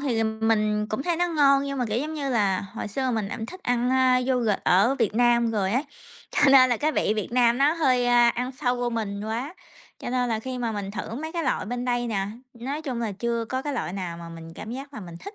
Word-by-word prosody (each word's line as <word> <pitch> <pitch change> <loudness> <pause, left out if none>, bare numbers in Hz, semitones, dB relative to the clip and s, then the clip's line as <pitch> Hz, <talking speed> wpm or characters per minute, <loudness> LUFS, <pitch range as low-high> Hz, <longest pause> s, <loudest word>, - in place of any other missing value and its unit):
thì, 260 -5 -1
ừm, 220 0 -1
mình 210 -1 +1
cũng 215 +5 -3
thấy 345 0 0
nó 350 +1 +2
ngon, 280 -5 +4
nhưng 275 -1 -3
mà, 250 - +1
kiểu 215 - 0
giống 305 +4 -3
như 280 -3 -2
là, 200 -6 +2
hồi 200 +1 -6
xưa 260 +5 -1
mình 220 -4 -1
cũng 225 - -5
thích 370 +9 -10
ăn, 245 0 +1
à, 260 -1 +4
yoghurt 240 -6 +1
ở 200 +9 +4
Việt 225 -3 +1
Nam 235 0 +3
rồi 205 -3 0
á, 255 - +2 0.5
cho - - -1
nên 255 -2 +7
là 240 - +2
cái 305 +6 0
vị - - +1
Việt 215 - -2
Nam 240 -1 +3
nó 285 +3 +4
hơi, 255 -7 +2
a, 240 -1 +5
ăn 250 +2 -2
sâu 250 -2 -1
vô 245 0 -1
mình 210 -3 -3
quá, 240 +9 -4 0.4
cho - - -5
nên 250 -1 0
là 225 -2 0
khi 255 +2 -5
mà 235 -2 -2
mình 200 -2 -4
thử 215 +2 -5
mấy 315 +5 -5
cái 340 -1 -2
loại 260 - -1
bên 245 +2 -3
đây 245 -1 0
nè, 200 -4 -1 0.3
nói 270 +6 -5
chung 255 -6 -3
là 225 -3 -2
chưa 235 +3 -2
có 260 +3 -3
cái 290 - -3
loại 235 -9 -3
nào 180 -3 -4
mà 170 0 -9
mình 165 0 -10
cảm 220 - -8
giác 275 +3 -8
là 220 - -6
mình 175 -4 -9
thích. 400 - -9
240 Hz, 270 wpm, -25 LUFS, 215-265 Hz, 0.5 s, nên